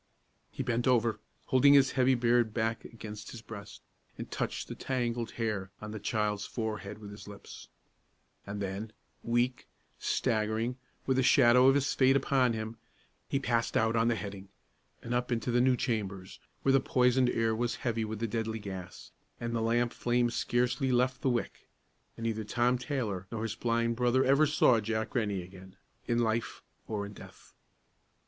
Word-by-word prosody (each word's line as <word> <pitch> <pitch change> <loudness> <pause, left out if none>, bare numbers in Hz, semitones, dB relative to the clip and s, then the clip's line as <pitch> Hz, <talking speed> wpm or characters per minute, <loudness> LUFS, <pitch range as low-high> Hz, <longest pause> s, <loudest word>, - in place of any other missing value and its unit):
He 135 - -4
bent 120 0 0
over, 120 -3 +2 0.3
holding 140 +2 +5
his 135 -1 +5
heavy 130 0 +3
beard 120 -2 +2
back 115 0 -1
against 110 -2 -9
his 115 -2 -9
breast, 100 -3 -10 0.3
and - - -7
touched - - -3
the - - -5
tangled 120 -3 -2
hair 105 -5 -2
on 105 0 -7
the 110 - -5
child's 105 -1 -1
forehead 105 -3 -4
with 105 -1 -10
his 105 - -11
lips; 100 -1 -11 0.8
and 100 +1 -4
then, 100 +3 -4 0.3
weak, 120 +2 0 0.3
staggering, 110 +3 0 0.3
with 130 -1 +1
the - - +4
shadow 125 0 +6
of 135 - +6
his 140 -1 +1
fate 130 0 +4
upon 130 -3 +2
him, 110 +1 -5 0.5
he 135 - +1
passed 120 -4 0
out 110 +1 +2
on 115 0 +3
the 120 - +2
heading, 100 -2 -7 0.5
and 120 - -3
up 125 +1 -1
into 120 +1 0
the 120 +1 +3
new 130 0 +4
chambers, 100 -8 -3 0.2
where 135 - +4
the 135 - +6
poisoned 125 0 +3
air 115 -2 +1
was 120 +1 -1
heavy 115 -2 0
with 110 0 -4
the 115 +2 -2
deadly 110 0 -2
gas, 95 -4 -8 0.3
and 115 0 -3
the 115 - 0
lamp 120 +1 +1
flame 120 0 +1
scarcely 125 +3 0
left 125 +1 +1
the 135 - +2
wick; 120 -2 -3 0.5
and 115 - -7
neither 110 -1 -1
Tom 120 +4 +1
Taylor 110 -10 -3
nor 115 -1 -3
his 115 -2 -2
blind 115 +1 0
brother 125 +1 +3
ever 140 +3 +5
saw 130 -5 +4
Jack 110 +1 -2
Rennie 105 -6 -1
again, 95 +1 -13 0.3
in 120 - +1
life 115 -1 -1 0.2
or 105 -2 -3
in 100 - -9
death. - - -14
115 Hz, 175 wpm, -30 LUFS, 110-125 Hz, 0.8 s, shadow